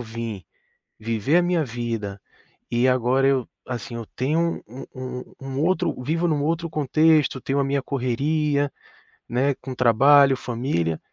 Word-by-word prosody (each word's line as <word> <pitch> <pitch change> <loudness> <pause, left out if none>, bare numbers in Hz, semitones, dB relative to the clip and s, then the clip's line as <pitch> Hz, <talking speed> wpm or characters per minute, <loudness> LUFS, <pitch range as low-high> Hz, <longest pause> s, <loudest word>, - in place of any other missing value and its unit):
vim 115 -3 -6 0.6
viver 115 +7 +1
a - - +5
minha 175 -2 +1
vida 115 -5 -4 0.5
e 120 +2 +2
agora 130 +1 +2
eu, 135 -3 +1 0.2
assim, 120 -1 -5
eu 115 -1 -5
tenho 160 +6 0
um 125 +5 -9
um 130 -1 -7
um 135 +1 -4
outro 185 -1 +1
vivo 165 +6 0
num 150 -3 0
outro 165 +2 -1
contexto, 155 -2 +2
tenho 135 +1 -1
a - - +3
minha 140 0 0
correria, 140 +3 0 0.6
né, 135 +4 +1
com 130 -1 -7
trabalho, 135 +3 +5
família, 115 - -2
135 Hz, 145 wpm, -23 LUFS, 120-145 Hz, 0.6 s, a